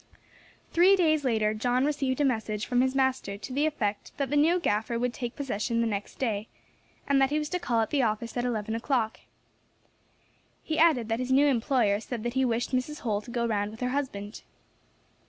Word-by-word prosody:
Three 365 Hz, +4 st, +6 dB
days 310 Hz, -5 st, +2 dB
later 220 Hz, -4 st, +1 dB
John 245 Hz, +4 st, +1 dB
received 275 Hz, -3 st, -1 dB
a 290 Hz, -, +3 dB
message 220 Hz, -4 st, -1 dB
from 245 Hz, -1 st, +2 dB
his 260 Hz, +1 st, +1 dB
master 260 Hz, -7 st, 0 dB
to 255 Hz, +5 st, -8 dB
the 290 Hz, +3 st, +2 dB
effect 215 Hz, -8 st, -3 dB
that 275 Hz, -2 st, -2 dB
the -, -, +1 dB
new 325 Hz, +5 st, +4 dB
gaffer 225 Hz, -5 st, 0 dB
would 245 Hz, +1 st, -1 dB
take 240 Hz, -1 st, -5 dB
possession 230 Hz, -4 st, -2 dB
next 205 Hz, -2 st, -4 dB
day, 220 Hz, -4 st, -2 dB, 0.6 s
and 275 Hz, -1 st, +3 dB
that 270 Hz, -, +4 dB
he 295 Hz, -, 0 dB
was 300 Hz, 0 st, -2 dB
to 360 Hz, -, -1 dB
call 235 Hz, -8 st, +1 dB
at 220 Hz, -, -2 dB
the 285 Hz, -, +2 dB
office 230 Hz, 0 st, -1 dB
at 245 Hz, -, -1 dB
eleven 220 Hz, -3 st, -2 dB
o'clock. 230 Hz, -1 st, -1 dB, 1.4 s
He 315 Hz, -, -2 dB
added 310 Hz, -9 st, +4 dB
that 225 Hz, +1 st, 0 dB
his 255 Hz, 0 st, -2 dB
new 275 Hz, +2 st, +5 dB
employer 245 Hz, -6 st, +2 dB
said 230 Hz, 0 st, -6 dB
that 240 Hz, 0 st, -2 dB
he 265 Hz, 0 st, +2 dB
wished 240 Hz, -1 st, 0 dB
Mrs. 260 Hz, +4 st, -2 dB
Holl 210 Hz, -4 st, -1 dB
to 225 Hz, -, -13 dB
go 235 Hz, -1 st, -1 dB
round 205 Hz, -3 st, 0 dB
with 220 Hz, +3 st, -12 dB
her 250 Hz, -, 0 dB
husband. 240 Hz, -7 st, -4 dB
245 Hz, 205 wpm, -28 LUFS, 220-275 Hz, 1.4 s, Three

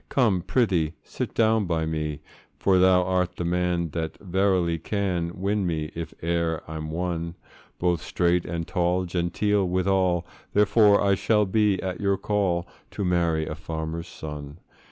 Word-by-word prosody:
Come, 110 Hz, -9 st, +2 dB
prythee 90 Hz, -6 st, +1 dB
sit -, -, -5 dB
down 110 Hz, -3 st, +3 dB
by 80 Hz, -2 st, 0 dB
me; 75 Hz, -2 st, -3 dB, 0.4 s
For 95 Hz, -2 st, +3 dB
thou 90 Hz, 0 st, +5 dB
art 90 Hz, 0 st, 0 dB
the 85 Hz, -, -3 dB
man 90 Hz, -1 st, 0 dB
that 80 Hz, -1 st, -4 dB
verily 95 Hz, -3 st, +1 dB
can 90 Hz, -2 st, -1 dB
Win 100 Hz, 0 st, 0 dB
me, 80 Hz, -2 st, -2 dB
if 85 Hz, 0 st, -5 dB
e'er 85 Hz, -1 st, 0 dB
I'm 80 Hz, -1 st, -5 dB
won; 85 Hz, 0 st, -3 dB, 0.4 s
Both 85 Hz, -2 st, +1 dB
straight 90 Hz, 0 st, +1 dB
and 85 Hz, -1 st, -4 dB
tall, 90 Hz, +1 st, +1 dB
genteel 90 Hz, +3 st, 0 dB
withal; 90 Hz, -1 st, +1 dB, 0.3 s
Therefore, 105 Hz, 0 st, +5 dB
I 100 Hz, -1 st, +4 dB
shall 105 Hz, +2 st, +2 dB
be 105 Hz, -1 st, +2 dB
at 95 Hz, 0 st, -4 dB
your 100 Hz, -1 st, +2 dB
call, 95 Hz, -5 st, 0 dB, 0.2 s
To 100 Hz, -, -3 dB
marry 85 Hz, -3 st, +1 dB
a 75 Hz, -, -4 dB
farmer's 80 Hz, +1 st, -5 dB
son. 75 Hz, -2 st, -8 dB
90 Hz, 155 wpm, -25 LUFS, 85-95 Hz, 0.4 s, thou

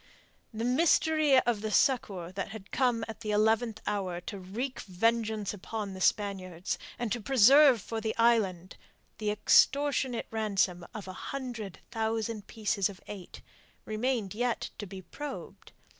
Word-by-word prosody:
The 225 Hz, 0 st, -3 dB
mystery 305 Hz, +1 st, +4 dB
of 230 Hz, -3 st, 0 dB
the 215 Hz, -, -2 dB
succour 200 Hz, -8 st, +1 dB
that 195 Hz, 0 st, -4 dB
had 205 Hz, -1 st, -10 dB
come 245 Hz, -4 st, +1 dB
at 220 Hz, -1 st, -8 dB
the 220 Hz, -2 st, -6 dB
eleventh 220 Hz, +1 st, +2 dB
hour 185 Hz, -4 st, -2 dB
to 200 Hz, +2 st, -7 dB
wreak 235 Hz, +8 st, -4 dB
vengeance 220 Hz, +1 st, 0 dB
upon 205 Hz, 0 st, -5 dB
the 190 Hz, -, -8 dB
Spaniards, 185 Hz, -4 st, 0 dB, 0.2 s
and 240 Hz, -3 st, -3 dB
to 240 Hz, -, -1 dB
preserve 265 Hz, +2 st, +6 dB
for 225 Hz, -1 st, -4 dB
the 220 Hz, 0 st, -2 dB
island 205 Hz, -6 st, +2 dB, 0.4 s
the 215 Hz, -1 st, -1 dB
extortionate 265 Hz, +4 st, +3 dB
ransom 195 Hz, -5 st, 0 dB
of 205 Hz, -3 st, -6 dB
a 185 Hz, -, -6 dB
hundred 235 Hz, -5 st, -6 dB
thousand 225 Hz, -1 st, -2 dB
pieces 205 Hz, -3 st, 0 dB
of 190 Hz, -2 st, -11 dB
eight, 195 Hz, -4 st, -9 dB, 0.4 s
remained 220 Hz, -2 st, -1 dB
yet 240 Hz, +2 st, -1 dB
to 205 Hz, -, -5 dB
be 190 Hz, 0 st, -9 dB
probed. 295 Hz, +9 st, -8 dB
220 Hz, 145 wpm, -30 LUFS, 195-240 Hz, 0.4 s, preserve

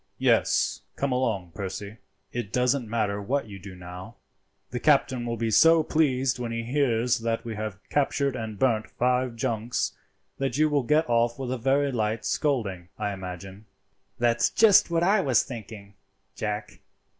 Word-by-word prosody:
"Yes, -, -, +2 dB
come 140 Hz, -1 st, -1 dB
along, 110 Hz, -9 st, -1 dB
Percy. 100 Hz, +2 st, -6 dB, 0.3 s
It 120 Hz, -5 st, -4 dB
doesn't 125 Hz, -1 st, +1 dB
matter 105 Hz, -3 st, -1 dB
what 135 Hz, +7 st, -1 dB
you 100 Hz, -2 st, -9 dB
do 95 Hz, 0 st, -10 dB
now. 90 Hz, +1 st, -9 dB, 0.6 s
The 125 Hz, -, -3 dB
captain 130 Hz, -4 st, +2 dB
will 115 Hz, 0 st, -2 dB
be 115 Hz, -1 st, -1 dB
so 165 Hz, +6 st, +6 dB
pleased 135 Hz, -5 st, +1 dB
when 120 Hz, -1 st, -3 dB
he 115 Hz, 0 st, -3 dB
hears 120 Hz, -2 st, +1 dB
that 115 Hz, 0 st, -2 dB
we 115 Hz, -, -4 dB
have 105 Hz, -2 st, -5 dB
captured 140 Hz, -1 st, +1 dB
and 110 Hz, -3 st, -5 dB
burnt 115 Hz, -4 st, +1 dB
five 125 Hz, 0 st, 0 dB
junks, 115 Hz, +1 st, -2 dB, 0.4 s
that 135 Hz, -1 st, -1 dB
you 155 Hz, 0 st, +4 dB
will 145 Hz, -1 st, +3 dB
get 150 Hz, +6 st, +2 dB
off 120 Hz, 0 st, +2 dB
with 130 Hz, -2 st, -4 dB
a 130 Hz, -, -1 dB
very 135 Hz, +3 st, +2 dB
light 110 Hz, -2 st, -1 dB
scolding, 100 Hz, -, -1 dB
I 105 Hz, -1 st, -2 dB
imagine." 95 Hz, +2 st, -8 dB, 0.5 s
"That's 120 Hz, 0 st, +2 dB
just 215 Hz, -6 st, +5 dB
what 170 Hz, 0 st, +1 dB
I 200 Hz, +3 st, +4 dB
was 130 Hz, -9 st, +3 dB
thinking, 110 Hz, -4 st, -9 dB, 0.4 s
Jack. 105 Hz, -1 st, -4 dB
120 Hz, 165 wpm, -26 LUFS, 105-135 Hz, 0.6 s, so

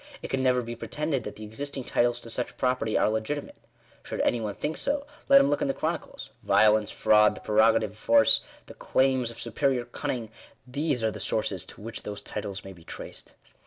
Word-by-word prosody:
It -, -, -5 dB
can 135 Hz, -, 0 dB
never 125 Hz, -1 st, +2 dB
be 120 Hz, 0 st, -6 dB
pretended 135 Hz, +4 st, -2 dB
that 105 Hz, -, -6 dB
the 110 Hz, -, -9 dB
existing 135 Hz, +5 st, -5 dB
titles 120 Hz, 0 st, +1 dB
to 115 Hz, -, -7 dB
such 125 Hz, +1 st, -4 dB
property 125 Hz, -4 st, +1 dB
are -, -, +3 dB
legitimate. 110 Hz, +7 st, -3 dB, 0.4 s
Should -, -, -6 dB
any 120 Hz, -, +1 dB
one 105 Hz, -2 st, -3 dB
think 155 Hz, +2 st, -3 dB
so, 285 Hz, 0 st, -1 dB, 0.2 s
let 275 Hz, 0 st, +9 dB
him 275 Hz, -, +4 dB
look -, -, 0 dB
in 285 Hz, -, +1 dB
the 275 Hz, -, -1 dB
chronicles. 160 Hz, +1 st, -4 dB
Violence, 110 Hz, -1 st, +4 dB
fraud, 105 Hz, 0 st, +4 dB
the -, -, -9 dB
prero 110 Hz, +1 st, +4 dB
gative -, -, +1 dB
of 105 Hz, -, -18 dB
force, 115 Hz, -1 st, +5 dB, 0.3 s
the -, -, -11 dB
claims 130 Hz, -2 st, +1 dB
of 115 Hz, -, -10 dB
superior 120 Hz, +2 st, 0 dB
cunning 120 Hz, -2 st, -4 dB, 0.2 s
— -, -, -32 dB
these 145 Hz, -6 st, 0 dB
are 110 Hz, -, +2 dB
the -, -, -8 dB
sources 100 Hz, -5 st, 0 dB
to -, -, -12 dB
which 115 Hz, +2 st, -6 dB
those 105 Hz, -1 st, -7 dB
titles 100 Hz, -1 st, -5 dB
may 95 Hz, -, -8 dB
be 85 Hz, -2 st, -17 dB
traced. -, -, -10 dB
115 Hz, 215 wpm, -27 LUFS, 110-135 Hz, 0.4 s, let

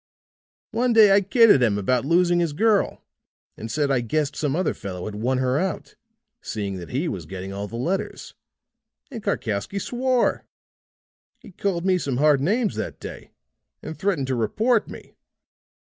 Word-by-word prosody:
One 245 Hz, +1 st, +1 dB
day 215 Hz, -3 st, +7 dB
I 200 Hz, +1 st, +6 dB
kidded 205 Hz, -, +5 dB
him 110 Hz, -4 st, +2 dB
about 125 Hz, +5 st, 0 dB
losing 175 Hz, +2 st, +3 dB
his 170 Hz, -4 st, 0 dB
girl 215 Hz, +5 st, +1 dB, 0.5 s
and 110 Hz, +1 st, -7 dB
said 145 Hz, -2 st, 0 dB
I 135 Hz, -, +2 dB
guessed 140 Hz, +5 st, -1 dB
some 145 Hz, -2 st, -1 dB
other 185 Hz, +2 st, 0 dB
fellow 90 Hz, -2 st, -7 dB
had 110 Hz, -, -5 dB
won 120 Hz, +5 st, -1 dB
her 130 Hz, +2 st, +1 dB
out, 190 Hz, +1 st, -3 dB, 0.5 s
seeing 100 Hz, -3 st, -4 dB
that 85 Hz, -2 st, -9 dB
he 140 Hz, +7 st, -1 dB
was 90 Hz, -, -5 dB
getting 95 Hz, +2 st, -7 dB
all 100 Hz, +1 st, -4 dB
the 115 Hz, -, -9 dB
letters, 170 Hz, +11 st, -3 dB, 0.8 s
and 235 Hz, -4 st, -6 dB
Karkowsky 125 Hz, -, -2 dB
swore. 250 Hz, +4 st, 0 dB, 0.9 s
He -, -, -15 dB
called 180 Hz, -1 st, -2 dB
me 185 Hz, -1 st, +3 dB
some 135 Hz, -6 st, -2 dB
hard 145 Hz, -1 st, +4 dB
names 210 Hz, -, +1 dB
that -, -, -5 dB
day -, -, -9 dB, 0.5 s
and 160 Hz, -, -6 dB
threatened 185 Hz, -8 st, -1 dB
to 130 Hz, 0 st, -1 dB
report 215 Hz, -, +1 dB
me. -, -, -11 dB
150 Hz, 165 wpm, -23 LUFS, -, 0.9 s, day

